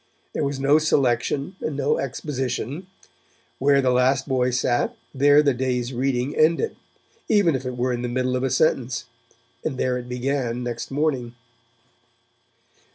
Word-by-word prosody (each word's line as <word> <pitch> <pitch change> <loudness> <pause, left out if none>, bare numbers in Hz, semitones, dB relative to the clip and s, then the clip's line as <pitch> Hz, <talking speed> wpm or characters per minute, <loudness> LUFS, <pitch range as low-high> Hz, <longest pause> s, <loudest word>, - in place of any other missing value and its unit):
There - - -1
was 140 -1 -2
no 140 +3 +4
selection 140 +3 0
and 150 -3 -3
no 145 +1 +1
exposition; 135 - -3 0.7
where 140 0 +4
the 130 - +3
last 130 +2 +2
boy 130 -2 +1
sat, 125 - 0 0.2
there 145 +2 +5
the 140 -2 +3
day's 125 0 -2
reading 130 +2 -1
ended, 165 - +2 0.5
even 200 -7 +4
if 130 -1 -3
it 125 -1 -5
were 125 +1 0
in 120 - -3
the 125 - -2
middle 125 +1 0
of 125 - -1
a 135 - 0
sentence, 125 -3 +1 0.6
and 140 -5 -2
there 125 -1 0
it 125 0 -9
began 125 -1 -2
next 120 -1 -4
morning. 135 -4 -1
130 Hz, 155 wpm, -23 LUFS, 125-145 Hz, 0.7 s, there